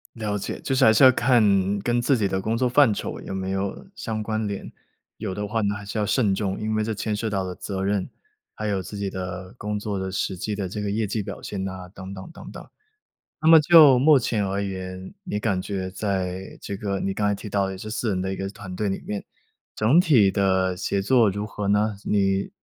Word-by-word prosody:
了 105 -3 -2
解。 100 - -5
就 135 - -2
是 130 - +3
还 110 - +7
是 110 - +5
要 130 - +10
看， 105 -6 +3
跟 120 +4 0
自 125 +2 +2
己 105 -3 +1
的 95 0 -1
工 110 +3 -1
作 125 +1 +2
范 125 -2 +5
畴 - - -5
有 - - -6
没 95 0 -3
有 95 - -3
相 110 - -4
关 110 0 -2
联， 100 -1 -5 0.5
有 95 - -4
的 105 +1 -3
话 110 +2 -1
呢， 100 0 0
还 100 0 -8
是 105 - -5
要 105 - +1
慎 105 -2 +2
重。 95 -1 -2
因 110 0 -1
为 110 - +1
这 110 - -2
牵 105 0 -2
涉 110 +1 -2
到 100 -2 -1
了 90 -1 -4
责 95 0 -4
任， 100 -1 0 0.5
还 110 - -3
有 100 -2 0
自 100 +2 -8
己 100 -1 -2
的 90 0 -6
工 105 0 -3
作 105 -2 -3
的 95 0 -3
实 95 0 -2
际 105 +3 -3
的 100 -2 -3
这 105 +3 -4
个 105 - -2
业 110 +2 0
绩 105 +1 -2
表 - - -7
现 100 -2 -4
呐， 95 -1 -6
等 95 -1 -8
等 95 -1 -9
等 - - -10
等。 - - -10 0.8
那 160 - +4
么 165 -1 +9
就 150 -5 +8
目 145 +2 +6
前 115 -4 0
而 100 +1 -1
言， 95 - -6
你 140 - -2
感 100 -3 0
觉 95 -1 -4
在 95 -1 -3
这 100 - -5
个 100 -1 -3
你 95 - -1
刚 105 +1 0
才 105 - +1
提 105 - -8
到 100 -1 +1
的 95 - -5
这 105 - -7
4 115 +1 -2
人 95 -3 0
的 95 - -2
一 95 - -4
个 95 0 -3
团 100 -2 -9
队 105 +2 -1
里 95 - -3
面， 105 -1 -4 0.5
整 120 +11 +4
体 130 - +5
的 95 -2 +1
协 100 +2 -1
作 115 0 +4
如 105 +2 -4
何 105 -2 -4
呢？ 105 0 +2
你 95 -1 +1
100 Hz, 260 characters per minute, -24 LUFS, 95-110 Hz, 0.8 s, 要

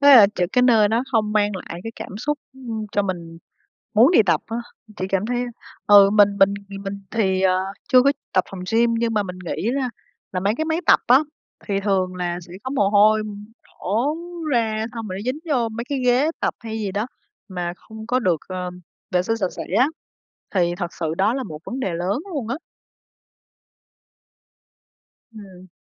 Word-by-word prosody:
thế 280 -1 +9
là 210 -4 +9
ch - - -5
cái 250 - +4
nơi 225 -4 +5
đó 225 +3 +1
không 215 -2 +1
mang 210 -1 +2
lại 170 -2 -7
cái 225 - -6
cảm 195 - -7
xúc, 295 +5 -1
ưm, 230 -5 -6
cho 205 - +2
mình 170 -4 -5 0.6
muốn 230 +8 +7
đi 340 - +6
tập 165 -4 +3
á, 225 - -4 0.4
thì 185 - -2
cảm 195 +1 0
thấy 245 +1 -1 0.4
ừ, 200 -1 +8
mình 205 -1 +5
mình 195 +1 +5 0.2
thì 195 - -6
mình 200 0 -6
thì, 190 -4 +1
ờ, 185 -1 +4 0.3
chưa 255 -2 +6
có 280 +2 +4 0.2
tập 185 - +3
phòng 195 - -7
gym, 230 +1 +3
nhưng 230 -1 0
mà 210 - +2
mình 180 -2 -7
nghĩ 195 +6 -2
là 260 -1 -1 0.4
là 185 - -1
mấy 200 +3 +1
cái 315 - -1
máy 320 +1 0
tập - - +6
á, 250 +2 +7 0.5
thì 200 -2 0
thường 190 -2 0
là 175 -1 -2
sẽ 170 0 -13
có 260 - -3
mồ 235 -8 +2
hôi 215 +1 +5 0.4
đổ 235 +10 -1 0.4
ra, 220 -2 +1
xong 225 -1 -6
rồi 185 0 -4
nó - - -6
dính 255 +4 -2
vô 240 -4 +2
mấy 230 +1 -5
cái 280 - -1
ghế 250 +5 +3
tập - - 0
hay 225 -1 -5
gì 205 -3 -3
đó 210 +3 -1 0.4
mà 175 -2 -3
không 220 +2 -11
có 250 +2 +2
được, 185 -9 +1
ờ, 180 -1 -4 0.4
vệ 180 -2 +2
sinh 225 +5 -1
sạch 190 -5 -1
sẽ - - -4 0.2
á, 255 - +5 0.7
thì 175 -2 +2
thật 175 -2 -4
sự 160 -1 -1
đó 210 +5 +3
là 270 - -2
một 155 -11 -7
vấn 255 +2 -5
đề 190 - -1
lớn 180 +7 -1
luôn 270 -8 -3
á. 250 - -1 2.8
Ừm. 190 -4 -12
210 Hz, 205 wpm, -22 LUFS, 185-235 Hz, 2.8 s, thế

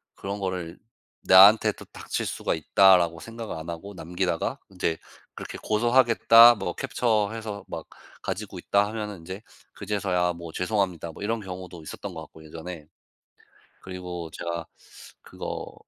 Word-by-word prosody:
그런 100 +1 -5
거를 90 -3 -4 0.5
'나한테도 105 +3 +7
닥칠 - - -5
수가 - - -2
있다.'라고 85 +1 +4
생각을 115 +1 -7
안 80 +1 -7
하고 85 +5 -7
남기다가 90 0 -2
인제 90 -4 -2 0.4
그렇게 - - -7
"고소하겠다. 120 0 +6
뭐 90 -5 -4
캡처해서 110 -4 -1
막 - - -6 0.4
가지고 - - -5
있다." 100 0 +2
하면은 105 -3 -5
인제 95 +5 -8 0.3
그제서야 95 -4 -1
뭐 85 -1 -9
"죄송합니다." 90 -3 -1
뭐 - - -13
이런 115 +2 -1
경우도 90 -3 -8
있었던 95 +5 -7
것 80 - -7
같고 80 0 -13
예전에. 80 0 -8 1.0
그리고 90 -2 -7
제가 85 -1 -4 0.6
그거 - - -7
95 Hz, 320 characters per minute, -26 LUFS, 85-105 Hz, 1.0 s, 나한테도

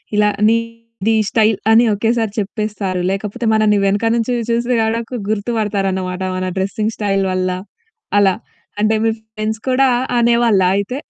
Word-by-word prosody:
ఇలా 210 0 +4 0.2
నీది 230 -1 -1
ఈ - - +2
స్టైల్ 220 -2 +2
అని 230 +2 +6
ఒకేసారి 225 +1 0
చెప్పేస్తారు. 205 -3 -3
లేకపోతే 210 +4 -4
మనల్ని 215 -1 +3
వెనక 205 +3 +1
నుంచి 235 +1 -1 0.2
చూసి 235 +1 0
గూడకు 230 +2 -2
గుర్తుపడతారు 210 -2 -1
అన్నమాట, 185 0 -4
మన 185 0 -2
డ్రెసింగ్ 210 +3 -1
స్టైల్ 195 -2 0
వల్ల, 185 0 0 0.7
అలా. 195 -2 +3 0.4
అంటే 215 +1 +2
మీ 225 - +3 0.3
ఫ్రెండ్స్ 215 +1 -3
కూడా 260 +1 +3 0.3
అనేవాళ్ళా 235 -5 +3
అయితే? 200 +6 -3
215 Hz, 140 wpm, -17 LUFS, 195-230 Hz, 0.7 s, అని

